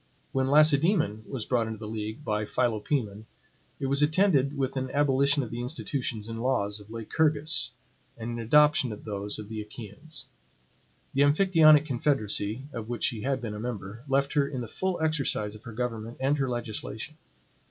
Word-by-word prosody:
When 130 0 +1
Lacedaemon 150 - +4
was 125 -6 -4
brought 120 -3 +1
into 110 0 -5
the 110 0 -7
league 110 +5 -5
by 105 0 0
Philopoemen, 110 -2 -1 0.5
it - - -2
was 140 +2 +2
attended 150 -3 +3
with 135 -1 -1
an 130 -1 -2
abolition 140 0 +2
of 120 - -7
the 120 +1 -4
institutions 125 -4 -3
and 115 0 -5
laws 105 -5 0
of 105 0 -15
Lycurgus, 145 +6 +1 0.5
and 115 +1 -5
an 120 - -4
adoption 150 +2 +4
of 105 - -8
those 105 -1 -4
of 105 - -7
the 110 0 -5
Achaeans. 125 +7 -9 0.9
The 135 - +2
Amphictyonic 155 0 +6
confederacy, 120 -4 0
of 115 -1 -6
which 120 - -3
she 115 -4 0
had 135 +1 -1
been 115 -3 -4
a 105 - -6
member, 110 -1 -5
left 140 +1 +1
her 145 -2 +3
in 130 -3 -4
the 120 - -5
full 185 - -2
exercise 140 -9 0
of 110 +2 -13
her 115 - -7
government 115 0 -4
and 135 +2 +2
her 135 -2 0
legislation. 120 +3 -4
125 Hz, 175 wpm, -28 LUFS, 110-145 Hz, 0.9 s, Amphictyonic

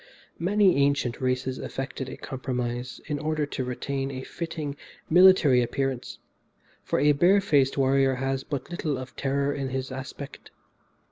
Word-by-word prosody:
Many 190 0 +3
ancient 140 -4 +1
races 130 0 -1
effected 135 -1 -5
a - - -8
compromise 125 -1 -4
in 150 -1 -3
order 155 0 -1
to 140 -2 -4
retain 135 +2 -3
a 130 -1 -6
fitting 155 -3 -5 0.4
military 175 -7 +7
appearance, 130 +1 -2 0.7
for - - 0
a 145 +2 +5
bare 175 +8 +5
faced 145 -9 +2
warrior 135 0 +3
has 135 +1 -2
but 140 +3 -5
little 155 -5 -2
of 130 +1 -8
terror 140 +1 0
in 135 -2 -3
his 130 0 -3
aspect. 135 +2 -8
135 Hz, 145 wpm, -26 LUFS, 130-150 Hz, 0.7 s, military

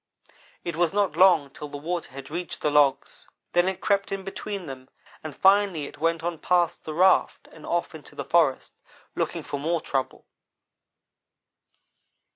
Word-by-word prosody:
"It 170 -2 -4
was 170 +1 +1
not 205 -1 +1
long 170 -7 +5
till 150 - -8
the 145 - -7
water 170 +4 -4
had 135 +2 -10
reached 175 +2 -5
the 150 - +1
logs; 145 -2 +1 0.2
then 175 +1 +3
it 190 -1 -3
crept 200 -1 +1
in 195 -1 -3
between 195 0 -6
them, 130 -2 -9 0.3
and 155 -3 -7
finally 195 -5 +3
it 145 - -11
went 165 +1 0
on 170 -2 -3
past 175 -2 +1
the 155 - -5
raft 185 +3 +3
and 155 - -13
off 170 0 -1
into 155 -4 -12
the - - -5
forest, 160 -6 +2 0.4
looking - - -2
for 145 - -5
more 165 +4 0
trouble. 135 -3 -3
165 Hz, 165 wpm, -25 LUFS, 145-185 Hz, 0.4 s, long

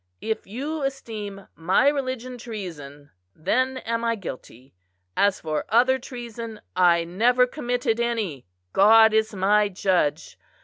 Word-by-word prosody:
If 220 0 -3
you 285 +9 -4
esteem 220 -8 -5
my 185 +11 +2
religion 255 -3 -2
treason, 150 - -8 0.2
then 255 +10 0
am 230 -2 -3
I 230 0 +1
guilty; 130 - -10 0.4
as 200 -1 +2
for 155 -1 -2
other 255 +3 +4
treason, 235 -3 -8 0.2
I 175 -2 +4
never 235 +9 +3
committed 245 -3 -2
any, 220 - -2 0.3
God 220 +2 +6
is 220 -1 +1
my 205 +2 +3
judge. 180 -5 -1
220 Hz, 125 wpm, -24 LUFS, 185-245 Hz, 0.4 s, God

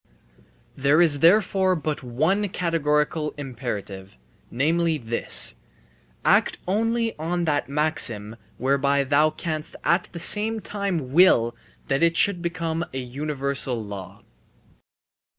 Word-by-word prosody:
There 140 +3 +3
is 160 -5 +4
therefore 190 +2 +3
but 155 -2 -3
one 160 - 0
categorical 150 -3 -1
imperative, 110 - -6 0.3
namely, 160 +5 +1
this: 115 -3 -2 0.7
Act - - +3
only 225 +3 0
on 170 +2 -2
that 145 -4 -1
maxim 130 -8 +1 0.2
whereby 140 +2 +1
thou 145 +3 +3
canst 155 0 -5
at 170 +3 +1
the 170 - -7
same 220 +5 +3
time 190 -11 -4
will 120 -9 +4 0.3
that 135 0 -1
it 170 0 +2
should 200 -4 +3
become 165 -1 -3
a 130 - -5
universal 135 -1 -3
law. 100 -2 -9
150 Hz, 115 wpm, -24 LUFS, 130-170 Hz, 0.7 s, is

